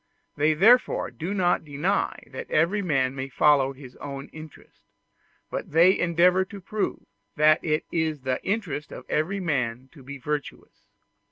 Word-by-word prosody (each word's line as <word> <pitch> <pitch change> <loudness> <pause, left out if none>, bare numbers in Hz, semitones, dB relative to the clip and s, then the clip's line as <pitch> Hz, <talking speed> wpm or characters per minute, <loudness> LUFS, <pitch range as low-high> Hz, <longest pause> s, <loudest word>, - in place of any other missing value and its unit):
They 155 +2 +2
therefore 235 +10 +4
do 160 +10 -5
not 185 -3 +1
deny 155 +7 -1
that 130 - -7
every 170 +7 +2
man 135 -8 0
may 135 0 -5
follow 135 0 +3
his 130 -2 -13
own 140 -1 -7
interest; 155 -1 -14 0.6
but - - -5
they 175 +4 +6
endeavor 180 +2 +3
to 200 +1 -10
prove 210 +2 -3 0.3
that 155 +1 +4
it 155 -1 0
is 160 -3 -1
the 130 -1 -2
interest 180 -8 -3
of - - -9
every 185 +6 -1
man 130 -7 -2
to 145 - -15
be 140 +2 -8
virtuous. 150 +2 -6
155 Hz, 155 wpm, -25 LUFS, 140-180 Hz, 0.6 s, they